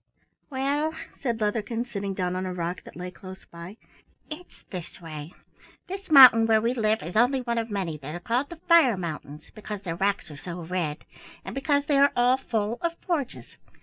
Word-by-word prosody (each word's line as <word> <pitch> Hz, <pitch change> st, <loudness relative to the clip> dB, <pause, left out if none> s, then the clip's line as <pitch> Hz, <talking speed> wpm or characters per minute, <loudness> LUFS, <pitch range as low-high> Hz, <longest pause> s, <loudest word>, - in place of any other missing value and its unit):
"Well," 290 Hz, +3 st, -1 dB, 0.2 s
said 235 Hz, -4 st, -3 dB
Leatherkin, 225 Hz, +2 st, -1 dB
sitting 200 Hz, -5 st, -4 dB
down 180 Hz, -1 st, -1 dB
on 185 Hz, -, -2 dB
a 185 Hz, -, -3 dB
rock 175 Hz, +1 st, -3 dB
that -, -, -12 dB
lay 180 Hz, +1 st, -6 dB
close 190 Hz, +1 st, -11 dB
by, 170 Hz, +5 st, -10 dB, 0.5 s
"it's 335 Hz, +4 st, -10 dB
this 180 Hz, -1 st, -7 dB
way. 155 Hz, -1 st, -8 dB, 0.5 s
This 385 Hz, +1 st, -7 dB
mountain 250 Hz, -6 st, +9 dB
where 220 Hz, -1 st, +5 dB
we 230 Hz, +3 st, 0 dB
live 220 Hz, -2 st, +1 dB
is 170 Hz, +5 st, -7 dB
only 250 Hz, +4 st, +3 dB
one 235 Hz, -1 st, -1 dB
of 225 Hz, 0 st, -4 dB
many 185 Hz, -7 st, -3 dB
that 150 Hz, +3 st, -7 dB
are -, -, -5 dB
called 240 Hz, +10 st, -1 dB
the 345 Hz, -, -7 dB
Fire 325 Hz, -, +4 dB
Mountains, 155 Hz, -3 st, -7 dB
because 210 Hz, -2 st, -7 dB
their 165 Hz, -3 st, -3 dB
rocks 195 Hz, -4 st, -1 dB
are 145 Hz, -, -10 dB
so 175 Hz, +3 st, -7 dB
red, 165 Hz, -3 st, -3 dB, 0.4 s
and -, -, -6 dB
because 285 Hz, +1 st, +1 dB
they 290 Hz, -2 st, +2 dB
are 280 Hz, 0 st, +6 dB
all 245 Hz, +1 st, +4 dB
full 225 Hz, -3 st, -2 dB
of 335 Hz, 0 st, -2 dB
forges. 300 Hz, -8 st, -3 dB
215 Hz, 195 wpm, -26 LUFS, 180-265 Hz, 0.5 s, mountain